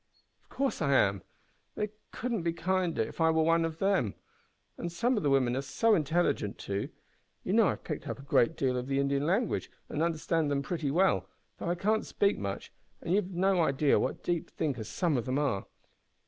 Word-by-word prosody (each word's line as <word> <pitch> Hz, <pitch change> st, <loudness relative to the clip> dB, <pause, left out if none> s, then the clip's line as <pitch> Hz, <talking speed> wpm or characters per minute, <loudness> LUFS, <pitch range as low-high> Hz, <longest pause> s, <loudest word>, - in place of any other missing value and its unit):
"Of -, -, -36 dB
course 275 Hz, -7 st, -1 dB
I 140 Hz, -3 st, +2 dB
am. 100 Hz, -5 st, +3 dB, 0.5 s
They 210 Hz, 0 st, -1 dB, 0.2 s
could 250 Hz, +2 st, -4 dB
not 215 Hz, -7 st, -1 dB
be 170 Hz, 0 st, 0 dB
kinder 175 Hz, -4 st, 0 dB
if 135 Hz, -, -6 dB
I 160 Hz, -, +5 dB
were 160 Hz, 0 st, +3 dB
one 165 Hz, +1 st, +3 dB
of 165 Hz, -1 st, -3 dB
themselves. 190 Hz, -, +1 dB, 0.6 s
And 170 Hz, -, -5 dB
some 235 Hz, +9 st, +1 dB
of 210 Hz, -, 0 dB
the 145 Hz, -, +1 dB
women 130 Hz, -3 st, +3 dB
are 135 Hz, -, 0 dB
so 225 Hz, +11 st, +2 dB
intelligent, 160 Hz, -, +1 dB
too! 100 Hz, 0 st, -3 dB, 0.5 s
You -, -, -1 dB
know -, -, +5 dB
I -, -, +3 dB
have -, -, -7 dB
picked -, -, -5 dB
up -, -, -3 dB
a 140 Hz, -, -11 dB
good 140 Hz, +2 st, +3 dB
deal 130 Hz, -3 st, 0 dB
of 125 Hz, +1 st, -3 dB
the 135 Hz, 0 st, 0 dB
Indian 140 Hz, +1 st, +1 dB
language, 210 Hz, +7 st, 0 dB, 0.2 s
and 150 Hz, -, -2 dB
understand 165 Hz, -1 st, 0 dB
them 140 Hz, -1 st, 0 dB
pretty 160 Hz, -2 st, -2 dB
well, 185 Hz, +7 st, +2 dB, 0.3 s
though -, -, -3 dB
I 175 Hz, -, +1 dB
can't 215 Hz, +5 st, +1 dB
speak 200 Hz, 0 st, +1 dB
much, 100 Hz, -1 st, -5 dB, 0.3 s
and 170 Hz, -, -2 dB
you've 195 Hz, -2 st, +1 dB
no 190 Hz, 0 st, +2 dB
idea 140 Hz, -1 st, +3 dB
what -, -, -2 dB
deep 175 Hz, -2 st, -1 dB
thinkers 130 Hz, -8 st, -3 dB
some 170 Hz, -7 st, +1 dB
of 120 Hz, -, -2 dB
them 130 Hz, +1 st, -1 dB
are! 140 Hz, -10 st, 0 dB
160 Hz, 215 wpm, -30 LUFS, 135-180 Hz, 0.6 s, I